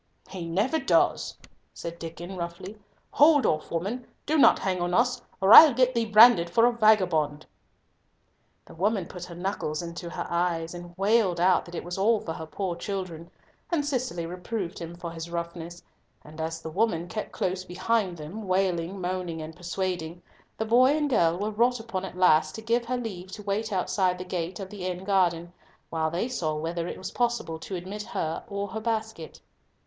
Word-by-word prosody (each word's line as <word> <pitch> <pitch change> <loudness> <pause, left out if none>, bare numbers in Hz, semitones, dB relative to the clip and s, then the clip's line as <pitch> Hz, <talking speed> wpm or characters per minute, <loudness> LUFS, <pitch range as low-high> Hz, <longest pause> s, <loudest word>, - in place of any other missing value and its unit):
"He 180 -3 -5
never 210 - +1
does!" 275 - +1 0.4
said 170 0 -7
Diccon, 170 +3 -7
roughly; 175 +3 -6 0.4
"hold 290 -4 +5
off, 155 - 0
woman, 200 +9 -3 0.2
do 305 - 0
not 295 - +6
hang 185 -2 -2
on 175 0 0
us, 245 +2 +2 0.2
or 195 +3 +6
I'll 305 -6 +11
get 255 0 +3
thee 230 -2 +1
branded 215 -5 +7
for 230 +7 +4
a 245 - +3
vagabond." 180 -10 +2 1.2
The - - -14
woman 195 +2 0
put 175 +1 -8
her 175 - -10
knuckles 175 -3 -3
into 170 0 -6
her - - -5
eyes, 170 -1 -1
and 175 0 -10
wailed 195 -3 +2
out 180 +1 +3
that 175 - -10
it - - -4
was 175 +2 -5
all 220 +3 +3
for 165 - -5
her 160 - -7
poor 180 +2 -3
children, 175 -3 -5 0.4
and 315 -5 0
Cicely 250 - -2
reproved 180 +2 -5
him 170 0 -7
for 170 -1 -7
his 165 0 -7
roughness, 170 0 -6 0.4
and 155 +1 -9
as 160 0 -4
the 160 - -6
woman 175 -3 0
kept 215 +4 -5
close 185 0 -2
behind 185 +1 -1
them, 185 +8 -7
wailing, 185 -1 0
moaning, 180 -2 -3
and 155 0 -7
persuading, 175 -1 -4 0.3
the 220 - -1
boy 255 +6 +5
and 295 -2 -1
girl 170 -7 +3
were 205 +3 -2
wrought 240 +3 +2
upon 215 -5 -4
at 185 - -9
last 155 -4 +4
to 220 - -8
give 235 +1 +1
her 250 +1 -1
leave 190 -6 -6
to 210 - -8
wait 205 +2 -2
outside 185 -1 +1
the 180 - -7
gate 180 +1 -4
of 195 0 -7
the 200 -3 -7
inn 180 0 -4
garden, 175 -3 +1 0.4
while 160 -1 0
they 175 +8 -2
saw 165 -12 -2
whether 165 +2 -3
it - - -5
was 185 - -6
possible 235 -9 -1
to 190 - -6
admit 190 +4 -6
her 160 -5 -3
or 200 0 -4
her 220 +4 -5
basket. 220 -6 -4
185 Hz, 190 wpm, -27 LUFS, 170-220 Hz, 1.2 s, I'll